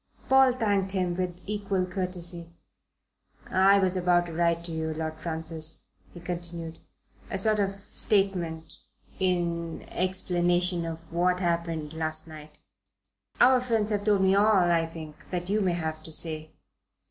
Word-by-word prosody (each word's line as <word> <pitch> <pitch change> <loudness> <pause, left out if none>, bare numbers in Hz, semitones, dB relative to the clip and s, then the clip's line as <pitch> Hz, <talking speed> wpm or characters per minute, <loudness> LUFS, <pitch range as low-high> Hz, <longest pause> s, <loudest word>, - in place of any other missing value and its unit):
Paul 265 -1 +6
thanked 200 -5 0
him 180 -2 0
with 180 -1 -3
equal 200 -2 -1
courtesy. 180 -2 -2 1.0
"I 195 +1 +5
was 190 -1 +3
about 175 -1 +3
to 170 - -8
write 170 0 +1
to 170 - -7
you, 160 -1 -3
Lord 160 0 -4
Francis," 160 -1 -1 0.2
he 175 - -11
continued, 170 -2 -5 0.5
"a - - -2
sort 215 +2 +3
of 195 -1 +1
statement 195 -5 -2 0.4
in 170 -3 -1
explanation 175 -1 +1
of 165 0 -5
what 180 +1 +2
happened 170 -3 -2
last 155 0 -2
night 155 -1 -12 0.4
" - - -37
"Our 255 0 +6
friends 225 -4 0
have 205 -1 0
told 205 -2 +3
me 190 0 +4
all, 200 -3 +4
I 165 -1 +2
think, 160 -2 -9
that 180 +1 -3
you 215 +1 +2
may 185 -3 +1
have 160 -2 -3
to 160 - -7
say." 155 -1 -2
175 Hz, 150 wpm, -27 LUFS, 165-195 Hz, 1.0 s, Paul